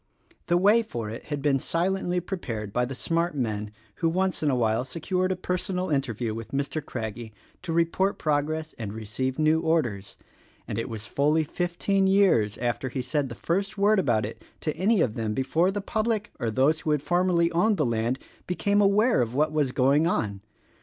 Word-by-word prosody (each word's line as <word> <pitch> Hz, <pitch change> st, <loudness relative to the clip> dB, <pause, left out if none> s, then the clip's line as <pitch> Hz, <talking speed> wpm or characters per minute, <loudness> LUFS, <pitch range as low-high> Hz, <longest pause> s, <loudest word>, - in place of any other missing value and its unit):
The 175 Hz, -, +3 dB
way 205 Hz, +6 st, +5 dB
for 115 Hz, -, -5 dB
it 115 Hz, -, -8 dB
had 145 Hz, -2 st, -4 dB
been 140 Hz, -2 st, +3 dB
silently 180 Hz, +3 st, 0 dB
prepared 120 Hz, -, -5 dB
by 125 Hz, -, +2 dB
the 130 Hz, +2 st, -6 dB
smart 170 Hz, +3 st, -1 dB
men 105 Hz, -5 st, -2 dB, 0.3 s
who 165 Hz, -, +1 dB
once 185 Hz, +2 st, 0 dB
in 150 Hz, -, +2 dB
a 135 Hz, -, +2 dB
while 115 Hz, -1 st, +1 dB
secured 180 Hz, +7 st, -1 dB
a -, -, +1 dB
personal 180 Hz, 0 st, -2 dB
interview 120 Hz, -5 st, -1 dB
with 115 Hz, +3 st, -8 dB
Mr. 140 Hz, +2 st, -2 dB
Craggie 110 Hz, -2 st, -6 dB, 0.3 s
to 180 Hz, -, -5 dB
report 170 Hz, +4 st, +1 dB
progress 155 Hz, +1 st, -1 dB
and 105 Hz, -3 st, -4 dB
receive 110 Hz, +5 st, -3 dB
new 155 Hz, +1 st, +3 dB
orders, 145 Hz, -12 st, -1 dB, 0.5 s
and 105 Hz, -, -3 dB
it 115 Hz, -, -3 dB
was 110 Hz, -2 st, -5 dB
fully 150 Hz, +8 st, +2 dB
fifteen 175 Hz, +4 st, 0 dB
years 190 Hz, -, +3 dB
after 120 Hz, +2 st, -2 dB
he 130 Hz, 0 st, -3 dB
said 135 Hz, +2 st, -1 dB
the 115 Hz, -, -7 dB
first 195 Hz, +4 st, -2 dB
word 205 Hz, +1 st, +4 dB
about 110 Hz, -, +2 dB
it 110 Hz, -, -8 dB, 0.2 s
to 155 Hz, -, -2 dB
any 195 Hz, +4 st, +2 dB
of 115 Hz, -, +1 dB
them 110 Hz, -2 st, -2 dB
before 160 Hz, +7 st, +2 dB
the 200 Hz, +1 st, -2 dB
public, 215 Hz, +1 st, -1 dB
or 115 Hz, -, -1 dB
those 135 Hz, +8 st, +2 dB
who -, -, -4 dB
had 150 Hz, -2 st, +1 dB
formerly 175 Hz, -1 st, +2 dB
owned 195 Hz, +5 st, +2 dB
the 150 Hz, -, +2 dB
land, 115 Hz, +2 st, 0 dB, 0.3 s
became 200 Hz, +3 st, +1 dB
aware 205 Hz, -, +4 dB
of 120 Hz, 0 st, -2 dB
what 150 Hz, +2 st, +2 dB
was 150 Hz, -4 st, +1 dB
going 140 Hz, +5 st, +3 dB
on. 100 Hz, -, -1 dB
155 Hz, 195 wpm, -26 LUFS, 120-180 Hz, 0.5 s, way